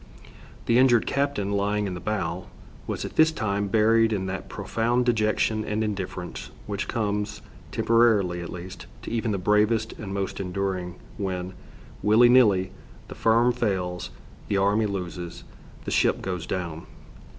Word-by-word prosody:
The 115 +1 +4
injured 125 -3 +5
captain, 140 -8 -1
lying 105 +1 0
in 95 - -3
the 90 - -5
bow, 95 -3 -3 0.4
was - - -3
at - - -8
this 160 0 +6
time 100 -7 -1
buried 115 +2 +4
in 95 -3 -1
that 95 0 -5
profound 120 +2 0
dejection 110 -1 +1
and 105 +1 -1
indifference 95 -4 -5 0.2
which 100 -1 -3
comes, 105 -3 -2 0.3
temporarily 110 -7 +3
at 85 - -6
least, 90 +1 -8 0.2
to - - -6
even 115 0 -1
the 100 - 0
bravest 105 +4 +2
and 100 -3 -6
most 100 0 -3
enduring 90 -1 -3 0.2
when, 95 -2 -3 0.5
willy 115 +3 +6
nilly, 105 -7 +5 0.4
the - - -6
firm 115 +2 +3
fails, 95 -7 -2 0.4
the 100 - 0
army 100 +3 +2
loses, 90 -3 -5 0.4
the - - -3
ship - - +2
goes 90 -3 -4
down. 85 -3 -4
105 Hz, 150 wpm, -25 LUFS, 95-115 Hz, 0.5 s, this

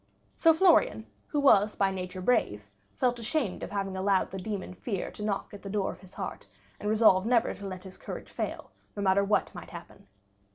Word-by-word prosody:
So 330 - +5
Florian, 320 - +4 0.2
who 295 - -1
was 215 -7 +5
by 195 -1 +2
nature 185 0 -5
brave, 105 - 0 0.2
felt 245 -1 +1
ashamed 235 - -1
of - - -5
having 195 -1 -3
allowed 190 0 +1
the 190 - -5
demon 195 -1 -4
Fear 195 0 -4
to 210 - -8
knock 205 -1 -2
at 205 - -9
the 195 - -7
door 195 -1 0
of - - -12
his 190 -1 -16
heart, - - -6 0.3
and 210 - -2
resolved 215 -3 +5
never 235 -2 +3
to 200 - -8
let 185 -1 -7
his 190 -1 -12
courage - - -8
fail, - - -4 0.2
no 205 - -3
matter 195 +1 +4
what 205 +1 +1
might - - -9
happen. - - -12
200 Hz, 205 wpm, -29 LUFS, 190-220 Hz, 0.3 s, So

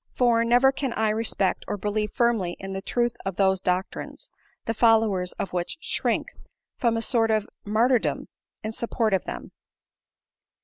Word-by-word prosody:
For, 235 -2 +3
never 245 +3 +5
can 270 -2 -2
I 220 -1 +1
respect 210 -3 +1
or - - -2
believe 210 +1 -2
firmly 230 -8 +1
in 195 0 -6
the 190 - -4
truth 240 +3 0
of 195 -2 -3
those 190 -1 +2
doctrines, 185 - -3 0.3
the 225 - -1
followers 220 -5 +3
of 195 - -5
which 175 -1 -2
shrink - - 0 0.5
from 230 -2 +1
a 225 - -1
sort 225 -1 +2
of 215 -1 +1 0.2
martyrdom 230 +4 +1 0.4
in 215 - -3
support 225 -1 -1
of 190 - +1
them." - - -7
220 Hz, 160 wpm, -25 LUFS, 195-235 Hz, 0.5 s, never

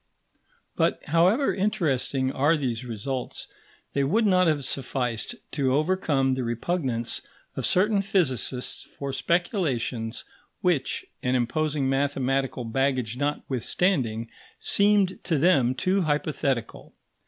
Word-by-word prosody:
But - - +1
however 185 - +3
interesting 140 -9 0
are 145 +5 +2
these 125 -4 -2
results, 125 +2 -4 0.5
they 140 - +1
would 210 +12 +2
not 185 -3 +4
have 150 -4 +1
sufficed 125 -4 -2 0.2
to 135 -3 +1
overcome 150 -5 +1
the 130 0 -2
repugnance 120 0 -2 0.3
of - - -1
certain 200 +2 +3
physicists 130 - 0
for 140 -1 -7
speculations 135 - -1 0.4
which, 175 -7 0 0.2
an 125 0 +1
imposing 145 +3 0
mathematical 135 -2 0
baggage 125 -1 0
notwithstanding, 130 - 0 0.3
seemed 200 -2 +3
to 165 -4 +1
them 135 -6 +3
too 185 +7 +1
hypothetical. 145 -6 -2
140 Hz, 110 wpm, -26 LUFS, 125-175 Hz, 0.5 s, not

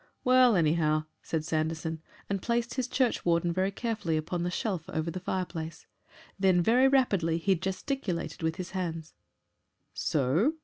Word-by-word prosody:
"Well, 255 -2 +6
anyhow," 155 -2 +2 0.2
said 160 -2 -3
Sanderson, 160 0 -2 0.3
and 195 -1 -2
placed 235 +1 -1
his 255 -2 -1
churchwarden 175 -10 +1
very 185 +2 +1
carefully 205 -6 -2
upon 170 +3 -2
the 175 - 0
shelf 180 -2 -3
over 160 +1 -2
the 185 - -5
fireplace. 175 -3 -4 0.5
Then 190 -2 +4
very 250 +7 +5
rapidly 200 -12 +2
he 190 +4 +2
gesticulated 185 - -3
with 160 0 0
his 185 -2 -6
hands. 165 -4 -4 0.8
"So?" 155 - +1
180 Hz, 140 wpm, -29 LUFS, 160-215 Hz, 0.8 s, Well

